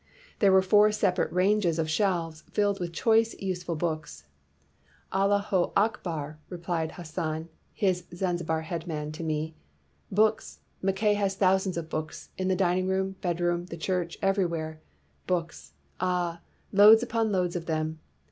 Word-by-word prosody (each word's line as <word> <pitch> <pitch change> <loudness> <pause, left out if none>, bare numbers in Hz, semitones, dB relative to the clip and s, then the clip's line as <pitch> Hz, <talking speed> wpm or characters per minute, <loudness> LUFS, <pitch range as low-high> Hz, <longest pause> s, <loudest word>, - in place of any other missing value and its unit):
" - - -26
There 200 -2 +5
were 190 0 +6
four 210 +3 +5
separate 195 -3 +1
ranges 185 -2 +2
of 160 -1 0
shelves 165 -2 0
filled 205 -1 +1
with 175 -2 -3
choice, 225 +6 +2
useful 180 -3 -3
books. 155 - -3 0.5
' 70 0 -35
Allah 195 +1 +3
ho 200 -3 0
Akbar,' 165 -8 -1
replied 170 -2 -3
Hassan, 160 -1 -4 0.2
his 185 -3 0
Zan 175 0 -1
zibar 160 -1 -2
head 165 +1 -5
man, 150 -2 -3
to 155 - -7
me; 155 0 -2 0.6
'books! 215 +2 +1 0.2
Mackay 195 +2 +2
has 200 -2 0
thousands 190 -1 +2
of 165 -2 -4
books, 155 0 -5
in 185 - -2
the 190 - +2
dining 185 0 +1
room, 190 0 0
bed 175 -2 -1
room, 175 0 0
the 170 - -7
church, 175 0 -2
everywhere. 170 -5 0 0.5
Books! 170 -3 -3 0.3
ah, 175 -2 -1 0.3
loads 215 +3 +8
upon 230 -2 0
loads 180 -2 0
of 170 -2 -4
them!' 155 -1 -2
180 Hz, 155 wpm, -28 LUFS, 160-195 Hz, 0.6 s, loads